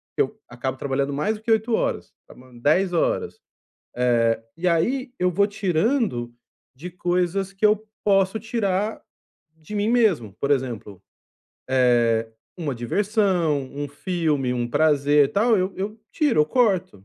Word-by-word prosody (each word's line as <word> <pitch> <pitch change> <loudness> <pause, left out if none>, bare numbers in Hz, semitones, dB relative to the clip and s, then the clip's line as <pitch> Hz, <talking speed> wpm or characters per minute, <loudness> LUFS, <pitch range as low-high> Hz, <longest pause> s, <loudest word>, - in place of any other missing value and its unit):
que - - +2
eu - - -2
acabo 130 +2 -4
trabalhando 140 +1 -1
mais 205 +10 0
do 220 - -19
que 225 - -1
8 220 +1 +2
horas, - - -2
trabalhando 125 -1 -16
10 175 +7 +2
horas, 165 - 0 0.9
eh, 115 0 -11
e 180 +2 -1
aí 245 +11 +1
eu 180 0 +2
vou 200 +3 +2
tirando 195 - 0 0.4
de 165 +8 -8
coisas 180 +2 -1
que 195 +2 0
eu 215 +1 +3 0.2
posso 195 +1 +2
tirar 215 -2 -1 0.5
de 160 +6 -9
mim 205 +1 0
mesmo, 195 - +2
por 140 - -1
exemplo, 115 -8 -2 1.0
eh, 115 -1 +1 0.3
uma 150 -6 -3
diversão, 175 - 0
um 145 0 -3
filme, 150 -5 -1
um 120 -1 -2
prazer, 145 -1 +3
tal, 220 +2 +3
eu 185 +1 0
eu 210 +3 -4
tiro, 290 - +2
eu 150 - +3
corto, 185 - 0
180 Hz, 150 wpm, -23 LUFS, 140-210 Hz, 1.0 s, eu